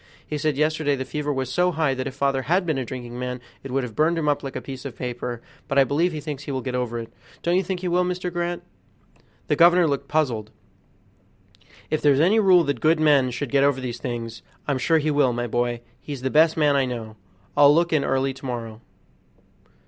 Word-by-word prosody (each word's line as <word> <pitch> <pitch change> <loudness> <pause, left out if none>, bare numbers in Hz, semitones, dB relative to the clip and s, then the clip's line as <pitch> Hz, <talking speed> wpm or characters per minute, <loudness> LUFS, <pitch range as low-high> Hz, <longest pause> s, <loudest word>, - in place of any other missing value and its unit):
He 150 - -4
said 150 -2 0
yesterday 155 -1 +1
the 130 -1 -4
fever 150 0 -3
was 130 -2 -2
so 180 +4 +2
high 155 -4 +1
that 130 +1 -3
if 135 - -7
father 140 -1 +1
had 180 +7 +1
been 155 -5 0
a - - -2
drinking 120 0 -7
man 125 0 -4 0.2
it 135 - -8
would 135 +1 0
have 115 -4 -7
burned 165 +2 +2
him 155 -2 -1
up 145 -1 +1
like 135 -1 -7
a - - -2
piece 130 -2 -8
of 135 -3 -7
paper; 120 -1 -5 0.2
but 135 - -1
I 135 - +7
believe 155 +7 +1
he 155 - -5
thinks 145 -1 -6
he - - -4
will 130 -2 -3
get 130 - -4
over 125 -2 -2
it; 115 0 -7 0.3
don't 170 +1 +2
you 185 - +3
think 185 -1 -4
he 185 - -2
will, 180 +1 +2
Mr. 180 0 -3
Grant?" 175 0 -2 0.8
The - - +1
governor 175 0 +5
looked 140 -2 -2
puzzled. 125 -9 0 1.4
"If 155 - 0
there's 140 -2 +4
any 190 +8 +4
rule 185 -4 +5
that 140 -6 -2
good 160 +1 +3
men 145 -4 +4
should 125 +2 -4
get 140 -1 +3
over 140 -2 +2
these 125 -2 -5
things, 115 -2 -5 0.3
I'm 140 -3 0
sure 160 +6 +3
he 155 0 0
will, 145 -4 +3
my 120 0 -2
boy; 120 0 -1 0.2
he's 140 -4 -7
the 130 - -1
best 160 +1 +4
man 150 -2 +3
I 135 -1 +3
know. 115 -3 -6 0.4
I'll 145 0 +7
look 170 +2 +2
in 150 -3 +3
early 135 0 0
to 135 - -12
morrow." 115 -3 -5
140 Hz, 235 wpm, -23 LUFS, 125-155 Hz, 1.4 s, I